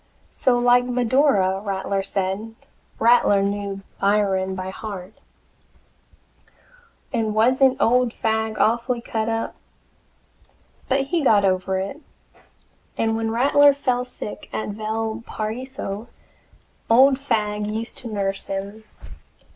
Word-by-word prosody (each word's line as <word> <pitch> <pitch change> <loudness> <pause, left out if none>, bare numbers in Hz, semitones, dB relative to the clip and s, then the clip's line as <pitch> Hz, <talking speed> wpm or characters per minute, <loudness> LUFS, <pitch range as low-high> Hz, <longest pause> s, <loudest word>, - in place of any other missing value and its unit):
So 250 -2 +2
like 245 0 +4
"Medora," 245 -6 +2
Rattler 195 -1 -2
said 195 +3 -3 0.4
Rattler 225 -4 +4
knew 200 -1 -3 0.2
Byron 195 -2 +1
by 185 0 -5
heart 195 -1 -7 2.0
and 220 -2 -1
wasn't 255 +4 +3
old 250 +1 +3
Fagg 220 -1 -1
awfully 235 +2 +1
cut 225 -1 -3
up? 225 0 -2 1.4
But 270 +1 +2
he 325 +5 -1
got 210 -6 +4
over 190 0 0
it, 195 +11 -4 1.0
and 225 0 +1
when 225 0 -1
Rattler 280 +4 +5
fell 250 -3 0
sick 250 -4 -8
at 215 - -3
Valparaiso, 220 +1 -4 0.8
old 260 +4 +6
Fagg 210 -6 -1
used 220 +2 -4
to 245 - -7
nurse 195 -2 -2
him. 200 +3 -5
220 Hz, 105 wpm, -22 LUFS, 200-245 Hz, 2.0 s, old